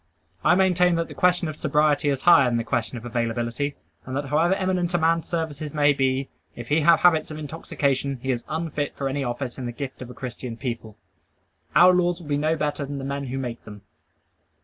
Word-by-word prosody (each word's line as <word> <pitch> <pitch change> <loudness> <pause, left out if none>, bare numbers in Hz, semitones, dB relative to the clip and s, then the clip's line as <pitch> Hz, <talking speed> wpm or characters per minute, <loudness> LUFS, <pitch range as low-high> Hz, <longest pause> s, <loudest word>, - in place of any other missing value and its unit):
I - - +5
maintain 180 -2 +3
that 165 0 -2
the - - -8
question 180 -1 +2
of 155 - -5
sobriety 150 -1 +2
is 135 -2 -1
higher 170 -6 +7
than 120 - 0
the 115 - -1
question 115 0 -2
of 115 - -9
availability; 120 +4 -2 0.3
and 130 +1 -4
that 145 - -2
however 165 +6 +3
eminent 185 -2 0
a - - +4
man's 165 0 +1
services 155 -3 -4
may 145 -1 +4
be, 135 0 0 0.3
if 120 -1 -8
he 155 +2 +3
have 165 +1 +5
habits 170 -3 +4
of 155 - -6
intoxication, 140 -3 -2
he 130 - 0
is 120 -2 -2
unfit 155 -2 -3
for 135 - -2
any 135 +1 -2
office 120 +1 -4
in 125 - -4
the - - -3
gift 130 +2 -7
of 125 - -7
a 125 - -10
Christian 125 -2 -6
people. 115 -4 -5 0.8
Our 180 +1 +8
laws 175 -1 +1
will 160 -4 -11
be 145 - +1
no 155 +2 +1
better 150 -1 -2
than 140 0 -5
the 135 - -5
men 140 0 -3
who 130 +1 -4
make 120 -3 -5
them. 105 -2 -11
145 Hz, 220 wpm, -24 LUFS, 130-165 Hz, 0.8 s, Our